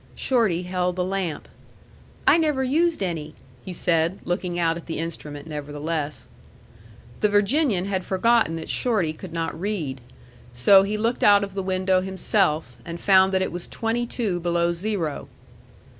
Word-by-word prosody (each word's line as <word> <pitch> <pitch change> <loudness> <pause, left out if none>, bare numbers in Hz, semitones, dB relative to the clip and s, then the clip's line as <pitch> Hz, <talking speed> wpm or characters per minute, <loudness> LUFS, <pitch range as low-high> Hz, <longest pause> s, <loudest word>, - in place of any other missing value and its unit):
Shorty 215 -9 +1
held 180 0 -1
the 180 - 0
lamp. 185 -4 -3 0.8
"I 335 - +6
never 300 -5 +1
used 315 - +1
any," 160 -4 -4 0.3
he 185 - -7
said, 170 +1 +1
looking 175 0 -2
out 165 -1 +1
at 170 - -9
the 165 - -4
instrument, 150 -3 -6
nevertheless. 150 0 -4 0.9
The 210 - +3
Virginian 205 - +2
had 190 -2 -2
forgotten 220 -1 +2
that 160 - -6
Shorty 205 -11 0
could 175 +2 -10
not 165 0 -3
read. 160 -11 -3 0.5
So 190 +11 +6
he 205 +2 -1
looked 230 +3 -1
out 205 -1 +6
of 200 -1 -5
the 195 - -2
window 185 0 +1
himself, 185 - 0
and 170 +6 -7
found 190 0 +5
that 190 0 +2
it - - -3
was 175 +1 -6
twenty 235 +1 -2
two 210 -8 -2
below 170 0 +1
zero. 170 -4 -3
185 Hz, 160 wpm, -24 LUFS, 165-205 Hz, 0.9 s, I